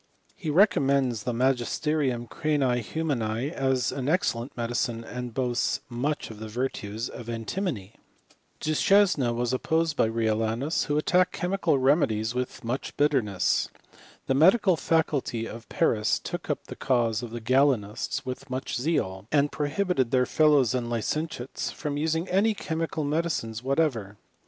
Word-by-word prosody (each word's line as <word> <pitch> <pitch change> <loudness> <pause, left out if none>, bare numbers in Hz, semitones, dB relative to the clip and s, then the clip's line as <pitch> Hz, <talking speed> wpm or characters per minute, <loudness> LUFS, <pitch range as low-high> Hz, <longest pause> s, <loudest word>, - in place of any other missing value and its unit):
He 160 - -5
re 180 +8 +7
commends 135 - 0
the 125 - 0
Tnagisterium 130 +1 0
cranii 135 -5 0
humani 125 -2 -2
as 130 -5 0
an 135 0 -3
ex 180 +5 +2
cellent 115 +2 -6
medicine, 120 -1 -1
and 125 +1 -6
boasts 120 0 0
much 130 +3 -2
of 105 - -11
the 110 - -6
virtues 110 -2 -3
of 120 -1 -9
antimony. 115 - -3 0.7
Du 155 - -1
Chesne 185 -8 +4
was 120 +1 -1
opposed 160 +4 0
by - - +3
Riolanus, 115 +5 0
who 145 - 0
attacked 180 +4 +2
chemical 180 -5 +1
remedies 130 -5 +2
with 125 +1 -4
much 120 +4 -4
bitterness. 105 - +1 0.6
The - - +1
medical 185 - +5
faculty 150 -8 0
of 115 0 -9
Paris 105 -2 +2
took - - -6
up - - -2
the - - -8
cause 120 -4 +1
of 120 - -6
the 120 +1 -6
Galenists 120 -3 +1
with 130 +2 -6
much 130 0 -3
zeal, 105 - -1
and 145 -1 +3
prohibited 150 -3 0
their 130 0 +3
fellows 145 -6 +4
and 125 -2 -1
licentiates 125 +3 -3
from 145 -2 -4
using 160 +3 0
any 205 +4 +2
chemical 160 -3 -3
medicines 145 -7 -1
what 135 +4 0
ever. 110 -11 0
130 Hz, 150 wpm, -27 LUFS, 115-155 Hz, 0.7 s, re